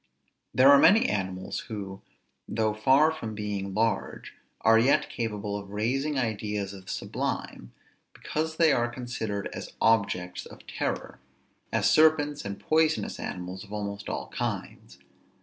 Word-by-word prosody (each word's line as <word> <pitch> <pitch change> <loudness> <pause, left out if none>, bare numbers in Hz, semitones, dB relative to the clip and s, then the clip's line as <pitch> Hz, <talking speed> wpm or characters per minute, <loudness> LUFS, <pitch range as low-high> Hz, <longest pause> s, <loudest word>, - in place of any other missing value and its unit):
There 135 +2 +7
are 140 - +8
many 215 +9 +6
animals, 95 -2 -3
who, 100 -3 -6 0.5
though 110 -1 0
far 135 +8 +4
from 115 -9 -6
being 100 -2 -4
large, 115 +1 -1 0.3
are 115 0 +6
yet 125 +5 +3
capable 105 -3 -3
of 100 -1 -6
raising 130 +8 -1
ideas 105 -4 -2
of 95 -1 -11
the - - -4
sublime, - - -4 0.4
because 160 +1 -3
they 165 -2 +5
are 120 -2 +2
considered 120 -5 -4
as - - -7
objects 100 -5 +1
of - - -14
terror. - - -4 0.5
As - - +2
serpents 150 -2 +4
and 100 0 -5
poisonous 160 0 +1
animals 90 +2 -5
of 100 - -15
almost 100 -1 -4
all - - -4
kinds. - - -5
110 Hz, 140 wpm, -27 LUFS, 100-135 Hz, 0.5 s, are